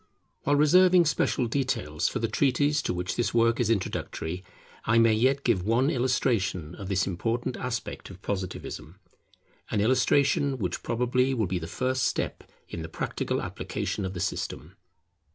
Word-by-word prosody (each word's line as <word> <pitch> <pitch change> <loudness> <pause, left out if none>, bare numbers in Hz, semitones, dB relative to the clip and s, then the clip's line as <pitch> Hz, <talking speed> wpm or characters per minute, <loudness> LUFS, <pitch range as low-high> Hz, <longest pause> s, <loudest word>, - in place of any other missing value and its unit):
While 145 - +3
reserving 180 +4 +6
special 150 -4 +1
details 115 - -1
for - - -2
the - - 0
treatise 145 +2 +2
to - - -2
which 90 0 -3
this 120 - -1
work 115 0 +3
is 120 -3 +1
introductory, 90 -4 -2 0.4
I 115 +1 +2
may 115 -1 +5
yet 130 +5 +2
give 105 -7 +2
one 120 - +2
illustration 110 - 0
of 95 +1 -8
this 95 0 +1
important 115 +7 -2
aspect 125 -2 -4
of - - -11
Positivism; 95 -2 -5 0.7
an - - 0
illustration 130 +4 +3
which 95 -7 -3
probably 125 +3 +1
will 110 -3 +1
be 90 0 -2
the 80 - -6
first 130 +5 -1
step 120 - -1 0.2
in 85 - -6
the 80 - -6
practical - - -2
application 100 - -3
of 95 0 -4
the - - -4
system. 95 -2 -4
115 Hz, 160 wpm, -27 LUFS, 95-130 Hz, 0.7 s, reserving